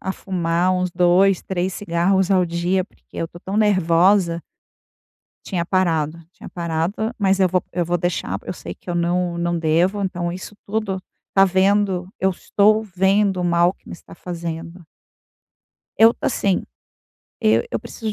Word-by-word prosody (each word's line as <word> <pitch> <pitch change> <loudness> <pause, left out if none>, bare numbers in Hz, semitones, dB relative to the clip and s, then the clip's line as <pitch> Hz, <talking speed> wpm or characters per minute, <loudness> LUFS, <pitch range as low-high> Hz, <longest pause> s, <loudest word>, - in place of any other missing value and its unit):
a 190 - -3
fumar 175 -1 0
uns 180 0 0
2, 180 +2 +3
3 185 0 -2
cigarros 190 +1 +1
ao 185 -2 +3
dia, 175 +2 0
porque - - -31
eu 165 - -2
tô 175 - -13
tão 190 +3 -5
nervosa. 185 -3 +3 1.0
Tinha 175 -4 -2
parado, 165 -4 0
tinha - - -12
parado. 175 +7 -2
Mas 195 -1 +2
eu 185 -2 +4
vou 185 -1 +1
eu 175 0 0
vou 175 +1 0
deixar, 165 - -2
eu - - -4
sei 85 - -8
que 180 - -13
eu 175 - -1
não 175 0 0
não 170 0 -1
devo. 170 +6 +1
Então 175 -3 -2
isso 185 +3 -8
tudo 200 -2 -2 0.3
tá 195 - +6
vendo 190 -1 +2
eu 190 - +2
estou 210 +3 +2
vendo 195 -1 +1
o - - -1
mal 175 +1 +3
que - - -24
me - - -8
está 170 - -13
fazendo. 170 0 -7 1.1
Eu, 225 +1 +7
assim, 200 -7 0 0.8
e 110 +1 +3
eu 115 - -2
preciso 220 -2 -5
180 Hz, 160 wpm, -21 LUFS, 170-195 Hz, 1.1 s, Eu